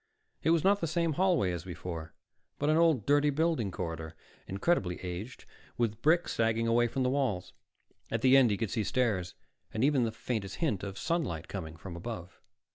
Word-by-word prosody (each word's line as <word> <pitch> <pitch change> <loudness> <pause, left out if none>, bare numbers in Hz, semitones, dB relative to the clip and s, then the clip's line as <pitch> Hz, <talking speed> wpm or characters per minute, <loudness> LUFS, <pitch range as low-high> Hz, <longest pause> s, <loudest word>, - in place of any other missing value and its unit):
It - - +1
was 165 -2 +3
not 200 +1 +4
the 165 - 0
same 165 0 0
hallway 175 - +2
as 85 -2 -4
before, 85 -3 -7 0.4
but 150 +1 +1
an - - +4
old, 160 -9 +3
dirty 145 +1 +4
building 150 -7 +1
corridor, 80 -3 -5 0.3
incredibly 95 - 0
aged, 95 +7 -6 0.3
with 110 -3 -1
bricks 170 +3 +3
sagging 115 0 +1
away 120 +1 +3
from 130 +3 -1
the 125 - +2
walls. 115 -10 -1 0.6
At - - -1
the 130 0 +7
end 130 -3 +6
he 100 - 0
could 110 -2 -2
see 110 - 0
stairs, 100 -7 0 0.4
and 110 - -1
even 140 -2 +4
the 115 - 0
faintest 110 -3 -4
hint 140 - 0
of 100 -1 -6
sunlight 135 - -2
coming 85 -5 -6
from 90 +1 -8
above. 90 -1 -7
115 Hz, 190 wpm, -31 LUFS, 90-145 Hz, 0.6 s, the